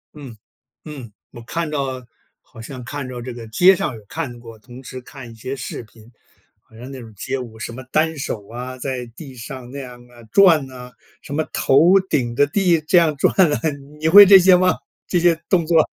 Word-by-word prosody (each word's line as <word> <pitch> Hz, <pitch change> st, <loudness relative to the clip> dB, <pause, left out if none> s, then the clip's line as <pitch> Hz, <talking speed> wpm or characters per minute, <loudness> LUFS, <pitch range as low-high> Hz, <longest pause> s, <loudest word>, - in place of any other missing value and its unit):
嗯， 135 Hz, -6 st, -10 dB, 0.5 s
嗯， 140 Hz, -8 st, -9 dB, 0.2 s
我 120 Hz, -, -11 dB
看 165 Hz, +7 st, -4 dB
到 135 Hz, -3 st, -3 dB, 0.4 s
好 115 Hz, -, -15 dB
像 125 Hz, +3 st, -9 dB
看 145 Hz, +1 st, -6 dB
着 125 Hz, -1 st, -7 dB
这 125 Hz, +1 st, -7 dB
个 120 Hz, -1 st, -9 dB
街 180 Hz, -, +5 dB
上 150 Hz, -, -3 dB
有 110 Hz, -, -12 dB
看 120 Hz, +2 st, -6 dB
过， 115 Hz, -1 st, -12 dB
同 125 Hz, +3 st, -13 dB
时 130 Hz, 0 st, -9 dB
看 125 Hz, -1 st, -12 dB
一 115 Hz, -, -13 dB
些 120 Hz, +4 st, -6 dB
视 120 Hz, -, -7 dB
频， 110 Hz, 0 st, -19 dB, 0.5 s
好 -, -, -30 dB
像 125 Hz, +3 st, -10 dB
那 135 Hz, -2 st, -9 dB
种 110 Hz, -2 st, -13 dB
街 130 Hz, +8 st, -3 dB
舞 115 Hz, -4 st, -9 dB
什 115 Hz, -, -6 dB
么 130 Hz, +2 st, -9 dB
单 160 Hz, +1 st, +1 dB
手 105 Hz, -7 st, -5 dB
啊， 125 Hz, +2 st, -7 dB
在 130 Hz, -1 st, -4 dB
地 130 Hz, +3 st, -12 dB
上 125 Hz, +1 st, -9 dB
那 140 Hz, -, -7 dB
样 125 Hz, -2 st, -10 dB
啊， 120 Hz, -1 st, -17 dB
转 165 Hz, -9 st, +4 dB
啊， 125 Hz, -1 st, -11 dB, 0.3 s
什 140 Hz, -, -7 dB
么 155 Hz, -, 0 dB
头 170 Hz, +8 st, +4 dB
顶 120 Hz, -5 st, -1 dB
着 145 Hz, +4 st, +3 dB
地 175 Hz, +1 st, +2 dB
这 180 Hz, -, +4 dB
样 165 Hz, -3 st, +3 dB
转 -, -, +2 dB
啊， 170 Hz, -6 st, +3 dB, 0.4 s
你 155 Hz, -, -1 dB
会 200 Hz, +5 st, +10 dB
这 195 Hz, 0 st, +8 dB
些 185 Hz, 0 st, +6 dB
吗？ 180 Hz, 0 st, +2 dB, 0.3 s
这 180 Hz, -, +1 dB
些 170 Hz, -1 st, +3 dB
动 175 Hz, -4 st, +2 dB
作。 160 Hz, -2 st, +4 dB
130 Hz, 230 characters per minute, -20 LUFS, 120-160 Hz, 0.5 s, 会